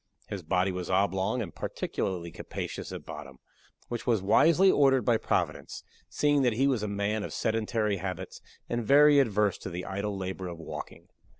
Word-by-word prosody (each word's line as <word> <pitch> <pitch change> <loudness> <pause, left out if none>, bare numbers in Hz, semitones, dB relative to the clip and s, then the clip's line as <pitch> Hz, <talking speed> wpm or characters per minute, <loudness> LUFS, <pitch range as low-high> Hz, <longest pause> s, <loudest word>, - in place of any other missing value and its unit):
His 100 - -4
body 90 +3 +1
was 90 -1 -5
oblong, 95 +4 +1
and 85 - -9
particularly 85 -3 -3
capacious - - -6
at - - -7
bottom; 65 - -9 0.5
which 120 +1 -5
was 115 -3 +3
wisely 170 - +5
ordered 135 -3 +3
by 120 -2 +4
Providence - - -2 0.3
seeing 145 -1 +2
that 125 -3 +2
he 130 +5 +2
was 130 -5 +1
a 105 - -2
man 100 +1 -1
of - - -5
sedentary 110 -2 0
habits, 95 -1 -6 0.3
and 120 0 -2
very 145 +4 +6
averse 105 -5 +2
to - - -6
the 90 0 -5
idle 100 +1 -3
labor 95 0 -4
of 85 -1 -7
walking. 80 - -8
105 Hz, 175 wpm, -29 LUFS, 95-120 Hz, 0.5 s, very